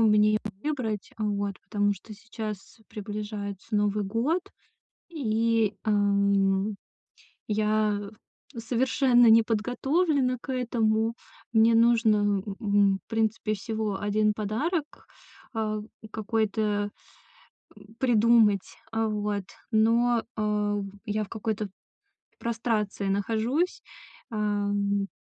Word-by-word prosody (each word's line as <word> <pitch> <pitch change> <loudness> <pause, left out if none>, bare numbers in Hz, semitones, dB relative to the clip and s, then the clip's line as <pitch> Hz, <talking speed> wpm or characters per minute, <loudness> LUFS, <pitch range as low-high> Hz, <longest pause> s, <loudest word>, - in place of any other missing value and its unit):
мне 220 -2 +5 0.5
выбрать. 245 -9 -2
Вот, 205 -2 -2
потому 205 -1 0
что 210 +2 -10
сейчас 215 -1 -7
приближается 205 0 -6
Новый 205 0 +1
год 240 - 0 0.7
и, 230 - +1
эм, 200 -1 +2 0.7
я 210 -1 +1 0.5
совершенно 245 +1 +3
не 225 0 +7
подготовлена 255 +5 +1
к 265 - -5
этому. 225 -3 +1 0.4
Мне 225 0 +5
нужно, 230 -2 +5
м, 205 -1 0
м, 205 -3 +3
в - - -68
принципе 220 -1 0
всего 215 -1 -3
1 210 +1 +1
подарок. 290 - -2 0.5
Э, 215 -1 -1 0.3
какой-то, 215 -1 0 0.9
м, 215 +2 -16
придумать. 230 -5 +3 0.2
О, 225 0 +1
вот, 210 -1 -2 0.3
но, 230 +2 +3
э, 210 -1 0 0.3
я 215 0 -1
в - - -14
какой-то 220 -1 -3 0.7
прострации 220 -4 -1
нахожусь. 225 - 0 0.5
Эм, 205 -2 0
215 Hz, 95 wpm, -27 LUFS, 205-230 Hz, 0.9 s, не